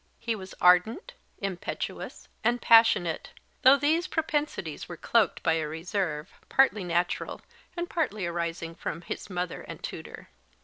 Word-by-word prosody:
He 230 Hz, -, -2 dB
was 190 Hz, -3 st, -9 dB
ardent, 200 Hz, -, +4 dB, 0.2 s
impetuous, 195 Hz, -3 st, -5 dB, 0.2 s
and 240 Hz, 0 st, +2 dB
passionate, 225 Hz, -9 st, +4 dB, 0.3 s
though 265 Hz, +2 st, +8 dB
these 315 Hz, +5 st, +2 dB
propensities 295 Hz, -, -2 dB
were 175 Hz, -, -7 dB
cloaked 230 Hz, -3 st, +2 dB
by 165 Hz, -1 st, +3 dB
a 155 Hz, -, -2 dB
reserve, 160 Hz, -1 st, -3 dB, 0.2 s
partly 265 Hz, -7 st, +4 dB
natural, 175 Hz, 0 st, -1 dB, 0.4 s
and 345 Hz, 0 st, -2 dB
partly 215 Hz, -, -1 dB
arising 170 Hz, -1 st, -3 dB
from 165 Hz, -, -4 dB
of 170 Hz, -, -13 dB
his 170 Hz, -, -6 dB
mother 180 Hz, -2 st, -3 dB
and -, -, -10 dB
tutor. -, -, -7 dB
190 Hz, 140 wpm, -28 LUFS, 170-245 Hz, 0.4 s, though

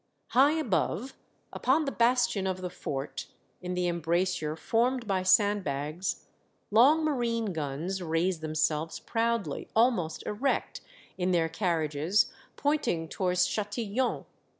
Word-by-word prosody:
High 275 Hz, +4 st, +5 dB
above, 265 Hz, -, -1 dB, 0.4 s
upon 315 Hz, -, +2 dB
the 275 Hz, -, -1 dB
bastion 235 Hz, -5 st, +2 dB
of 185 Hz, -1 st, -2 dB
the 180 Hz, -1 st, -4 dB
fort, 140 Hz, -5 st, -5 dB, 0.3 s
in 180 Hz, 0 st, -4 dB
the 180 Hz, 0 st, 0 dB
embrasure 170 Hz, -1 st, 0 dB
formed 240 Hz, +7 st, 0 dB
by 195 Hz, -3 st, 0 dB
sandbags, 185 Hz, -5 st, +1 dB, 0.5 s
long 285 Hz, +9 st, +5 dB
marine 230 Hz, -8 st, 0 dB
guns 160 Hz, +5 st, -3 dB
raise 170 Hz, +1 st, 0 dB
themselves 155 Hz, 0 st, -1 dB
proudly, 230 Hz, -1 st, -1 dB
almost 220 Hz, -9 st, +2 dB
erect 245 Hz, +7 st, -1 dB, 0.4 s
in 180 Hz, +1 st, +1 dB
their 170 Hz, -3 st, +2 dB
car 165 Hz, -3 st, 0 dB
riages, 155 Hz, +8 st, +1 dB, 0.2 s
pointing 285 Hz, -, 0 dB
towards 180 Hz, 0 st, +1 dB
Chatillon. 215 Hz, +4 st, -2 dB
185 Hz, 120 wpm, -29 LUFS, 165-235 Hz, 0.5 s, High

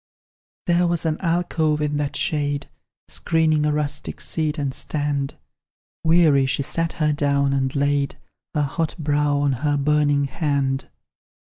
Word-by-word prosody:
There 175 Hz, 0 st, +3 dB
was 170 Hz, -1 st, -1 dB
an 155 Hz, -1 st, 0 dB
alcove 165 Hz, -3 st, +1 dB
in 150 Hz, -1 st, -1 dB
that 145 Hz, -1 st, -2 dB
shade, 145 Hz, -5 st, -1 dB, 0.4 s
Screening 155 Hz, -2 st, +1 dB
a -, -, +2 dB
rustic 150 Hz, -1 st, -2 dB
seat 155 Hz, -1 st, -1 dB
and 140 Hz, -2 st, -2 dB
stand; 145 Hz, -1 st, -2 dB, 0.7 s
Weary 160 Hz, -5 st, +4 dB
she 140 Hz, -, 0 dB
sat 165 Hz, +4 st, -2 dB
her 150 Hz, -2 st, +1 dB
down, 140 Hz, -1 st, +1 dB
and 130 Hz, 0 st, 0 dB
laid 140 Hz, 0 st, +1 dB, 0.4 s
Her 150 Hz, -, +2 dB
hot 155 Hz, +3 st, -2 dB
brow 145 Hz, -2 st, +1 dB
on 145 Hz, 0 st, +2 dB
her 145 Hz, -1 st, +1 dB
burning 145 Hz, 0 st, +2 dB
hand. 140 Hz, -2 st, -1 dB
150 Hz, 140 wpm, -22 LUFS, 140-155 Hz, 0.7 s, Weary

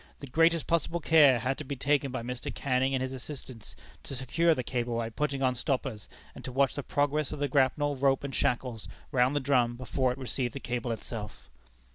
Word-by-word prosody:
The -, -, -7 dB
greatest 165 Hz, +4 st, +3 dB
possible 170 Hz, +1 st, 0 dB
care 150 Hz, -5 st, +6 dB
had 130 Hz, +4 st, -2 dB
to -, -, -4 dB
be 140 Hz, 0 st, -5 dB
taken 140 Hz, 0 st, +1 dB
by 125 Hz, -2 st, -4 dB
Mr. 125 Hz, +1 st, -4 dB
Canning 130 Hz, 0 st, 0 dB
and 130 Hz, -, 0 dB
his 130 Hz, 0 st, -4 dB
assistants, 130 Hz, -3 st, -9 dB, 0.3 s
to 135 Hz, -, -7 dB
secure 160 Hz, +6 st, +2 dB
the 125 Hz, -, -2 dB
cable 120 Hz, -1 st, -2 dB
by 115 Hz, -1 st, -2 dB
putting 140 Hz, +2 st, -1 dB
on 130 Hz, -1 st, +3 dB
stoppers, 125 Hz, -4 st, -2 dB, 0.2 s
and -, -, -11 dB
to 130 Hz, -, -5 dB
watch 135 Hz, +1 st, +2 dB
the 145 Hz, -, -3 dB
progress 145 Hz, +2 st, 0 dB
of 150 Hz, -, -4 dB
the 145 Hz, 0 st, 0 dB
grapnel, 140 Hz, +2 st, +2 dB
rope, 135 Hz, 0 st, +2 dB
and 140 Hz, -1 st, -4 dB
shackles, 125 Hz, -4 st, -1 dB, 0.2 s
round 130 Hz, +1 st, +3 dB
the -, -, +3 dB
drum, 125 Hz, -3 st, +2 dB
before 130 Hz, +1 st, 0 dB
it 125 Hz, -, -5 dB
received 130 Hz, -1 st, -3 dB
the -, -, -3 dB
cable 120 Hz, 0 st, -3 dB
itself." 110 Hz, -, -7 dB
130 Hz, 210 wpm, -29 LUFS, 125-145 Hz, 0.3 s, care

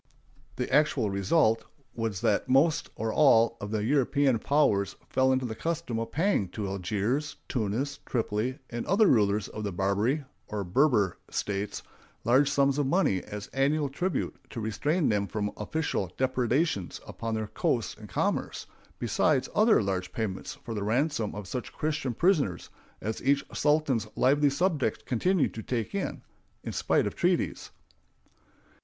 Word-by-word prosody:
The 125 Hz, 0 st, -2 dB
actual 140 Hz, -7 st, +3 dB
result 110 Hz, -, +2 dB, 0.3 s
was 110 Hz, -5 st, -3 dB
that 100 Hz, -, +1 dB
most 150 Hz, +3 st, +3 dB
or 110 Hz, 0 st, -2 dB
all 115 Hz, -6 st, +5 dB
of 100 Hz, -, -4 dB
the 105 Hz, -1 st, -1 dB
European 135 Hz, 0 st, +2 dB
powers 100 Hz, -9 st, +2 dB, 0.2 s
fell 130 Hz, 0 st, +3 dB
into 130 Hz, -1 st, +1 dB
the 115 Hz, -, -3 dB
custom 160 Hz, -3 st, -3 dB
of 115 Hz, -, -4 dB
paying 160 Hz, -, +1 dB
to 105 Hz, -, -3 dB
Algiers, 105 Hz, -, -1 dB
Tunis, 125 Hz, +4 st, -2 dB
Tripoli, 115 Hz, +2 st, -1 dB
and 120 Hz, 0 st, -3 dB
other 210 Hz, +3 st, +4 dB
rulers 105 Hz, -, +3 dB
of 110 Hz, -, -6 dB
the 100 Hz, -, -2 dB
Barbary 100 Hz, -, 0 dB, 0.2 s
(or 105 Hz, -1 st, -3 dB
Berber) 105 Hz, -, +2 dB
States 100 Hz, 0 st, -3 dB, 0.4 s
large 135 Hz, +4 st, +4 dB
sums 140 Hz, 0 st, +2 dB
of 145 Hz, -, +1 dB
money 135 Hz, -, +2 dB
as 105 Hz, -1 st, -7 dB
annual 140 Hz, +2 st, +1 dB
tribute 175 Hz, +7 st, -2 dB
to -, -, -6 dB
restrain 145 Hz, -, 0 dB
them 100 Hz, -1 st, +1 dB
from 105 Hz, 0 st, -2 dB
official 105 Hz, -, -2 dB
depredations 130 Hz, -, 0 dB
upon 115 Hz, -1 st, -4 dB
their 110 Hz, 0 st, -2 dB
coasts -, -, -1 dB
and -, -, -12 dB
commerce, -, -, -1 dB, 0.3 s
besides 130 Hz, +4 st, +1 dB
other 215 Hz, -, +4 dB
large 95 Hz, -2 st, -2 dB
payments 100 Hz, -4 st, -4 dB
for 115 Hz, -, -8 dB
the 105 Hz, -, -3 dB
ransom 115 Hz, 0 st, 0 dB
of 105 Hz, -2 st, -6 dB
such 125 Hz, +8 st, -5 dB
Christian 150 Hz, -5 st, -2 dB
prisoners 150 Hz, -, +1 dB, 0.3 s
as 110 Hz, +2 st, -3 dB
each 140 Hz, +2 st, +2 dB
sultan's 150 Hz, -7 st, +1 dB
lively 145 Hz, +2 st, +4 dB
subjects 155 Hz, 0 st, 0 dB
continued 170 Hz, +7 st, +1 dB
to 110 Hz, -, -6 dB
take 115 Hz, -1 st, -3 dB
in 200 Hz, -, -3 dB, 0.5 s
spite -, -, +1 dB
of -, -, -2 dB
treaties. -, -, 0 dB
120 Hz, 150 wpm, -28 LUFS, 105-145 Hz, 0.5 s, all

